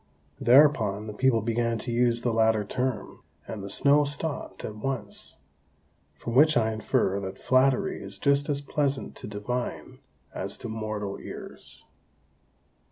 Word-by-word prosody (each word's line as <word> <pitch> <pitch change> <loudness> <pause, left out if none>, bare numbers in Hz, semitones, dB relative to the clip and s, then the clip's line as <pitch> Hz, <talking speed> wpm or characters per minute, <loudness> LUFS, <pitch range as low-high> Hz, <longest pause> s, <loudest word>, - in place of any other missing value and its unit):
Thereupon 125 -6 +4
the 105 - -6
people 115 -1 +2
began 115 0 0
to 120 - -4
use 120 0 +2
the 120 -2 0
latter 110 -1 +3
term, 125 -1 -3 0.3
and 105 -3 -6
the 100 - -6
snow 140 +8 +5
stopped 145 +1 -4
at 105 - -6
once; 110 -3 -3 0.8
from 115 - -6
which 150 +3 +6
I 110 -1 +2
infer 100 -2 0
that 95 -1 -6
flattery 130 0 +2
is 100 0 -7
just 140 +3 +2
as 140 -1 0
pleasant 140 -1 -1
to - - -8
divine 105 +4 -4 0.3
as - - -4
to - - -7
mortal 110 -2 -4
ears. - - -9
115 Hz, 145 wpm, -27 LUFS, 105-135 Hz, 0.8 s, which